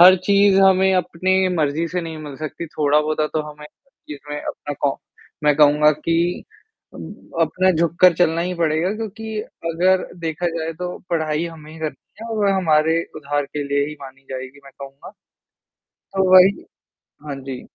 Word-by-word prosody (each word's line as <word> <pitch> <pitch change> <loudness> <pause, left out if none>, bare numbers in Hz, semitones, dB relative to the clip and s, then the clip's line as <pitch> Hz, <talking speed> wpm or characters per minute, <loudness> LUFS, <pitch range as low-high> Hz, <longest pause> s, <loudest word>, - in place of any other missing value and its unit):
हर 185 +2 +9
चीज़ 200 -1 +4
हमें 190 0 +5
अपने 185 +1 +1
मर्ज़ी 155 +2 0
से 180 +3 -2
नहीं 165 -2 -7
मिल 145 -3 -8
सकती 155 +3 -6
थोड़ा-बहुत 150 0 0
तो 155 - +1
हमें 150 0 -12 0.4
जिसमें 145 0 -7
अपना 145 - -6
कॉ 140 -1 +1 0.5
मैं 150 0 +4
कहूँगा 150 0 +5
कि 165 +3 -1 0.5
उम, - - -8 0.3
अपना 180 +4 +2
झुककर 170 +2 +4
चलना 165 -1 +2
ही 180 +1 -2
पड़ेगा 165 +2 0
क्योंकि 220 0 -6 0.3
अगर 185 +3 +2
देखा 165 +1 -3
जाए 160 0 -3
तो 180 0 -5
पढ़ाई 155 -1 0
हमें 155 -2 -11
ही 160 - -12
करनी 155 -3 -4 0.3
है 230 - -7
और 205 -2 +2
हमारे 165 -3 +2
उधार 145 -1 -2
के 150 - -2
लिए 140 0 +1
ही 150 - -8
मानी 135 -1 -12
जाएगी 130 +1 -7
मैं 140 - -14
कहूँगा। 135 0 -10 0.8
तो 190 - -2
वही 185 +2 +6 0.6
हाँ 145 - -4
जी। 130 -2 -6
160 Hz, 160 wpm, -20 LUFS, 150-180 Hz, 0.8 s, हर